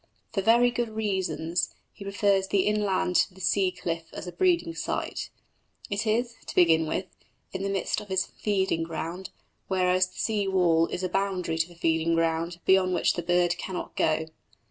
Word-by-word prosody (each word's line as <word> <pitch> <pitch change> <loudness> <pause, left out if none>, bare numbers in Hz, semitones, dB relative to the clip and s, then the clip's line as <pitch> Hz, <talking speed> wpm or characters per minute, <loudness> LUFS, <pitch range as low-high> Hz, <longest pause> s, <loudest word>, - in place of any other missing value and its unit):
For 195 - +1
very 235 +4 +5
good 240 -1 -2
reasons 190 -6 -1 0.2
he - - -10
prefers 200 -1 +1
the 200 -1 +2
inland 205 -3 +1
to 185 - +1
the - - -14
sea 190 +1 +2
cliff 165 -2 -4
as - - -6
a 180 - -6
breeding 340 - +1
site. - - -3 0.6
It 205 +3 -1
is, 235 +2 +1
to - - -7
begin 165 -2 +5
with, 180 +4 -2 0.5
in 190 - -3
the 195 - -1
midst 195 +2 -1
of 210 - -11
his 190 -1 +1
feeding 190 -5 -1
ground, 165 +3 -5 0.4
whereas 185 -1 +2
the 185 - -19
sea 210 -3 0
wall 170 -4 +3
is 180 - -4
a 185 - 0
boundary 180 -4 -1
to 170 +2 -1
a - - -20
feeding 165 0 +1
ground 165 +1 0
beyond 190 -1 +4
which - - +2
the 175 - -3
bird 175 0 +1
cannot 185 -2 -5
go. 160 0 +1
185 Hz, 185 wpm, -27 LUFS, 170-200 Hz, 0.6 s, very